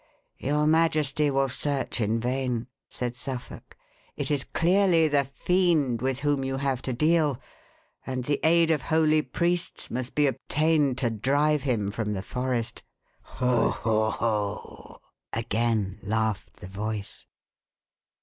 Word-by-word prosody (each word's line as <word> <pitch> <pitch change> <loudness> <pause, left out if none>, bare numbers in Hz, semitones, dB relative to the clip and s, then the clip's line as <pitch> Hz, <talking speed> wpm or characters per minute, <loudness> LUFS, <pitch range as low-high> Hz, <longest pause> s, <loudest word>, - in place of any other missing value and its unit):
"Your 150 +3 +1
majesty 155 -2 +2
will 135 0 +2
search 135 -1 -2
in 110 +2 +1
vain," 125 -1 -1 0.2
said 120 -1 -4
Suffolk; 125 0 -8 0.4
"it - - -2
is 140 -2 0
clearly 175 -2 +3
the 145 -2 +2
fiend 155 - +1
with 130 +1 -1
whom 145 -2 +1
you 135 0 -2
have 135 -2 -1
to 130 - -3
deal, 150 0 +2 0.6
and 130 -1 -3
the 145 +1 0
aid 165 0 +4
of 155 -3 +1
holy 155 0 +3
priests 170 +5 -2
must 125 +1 -4
be 150 - +4
obtained 145 +1 +1
to 120 -3 0
drive 145 +7 +1
him 115 -7 0
from 105 -1 -2
the 95 -1 -4
forest." 125 -1 -3 0.6
"Ho! 125 -3 +2
ho! 110 -1 +1
ho!" 105 -3 -3 0.3
again 110 -3 -1
laughed 110 -1 -2
the - - -7
voice. 105 +1 -5
130 Hz, 135 wpm, -26 LUFS, 115-150 Hz, 0.6 s, aid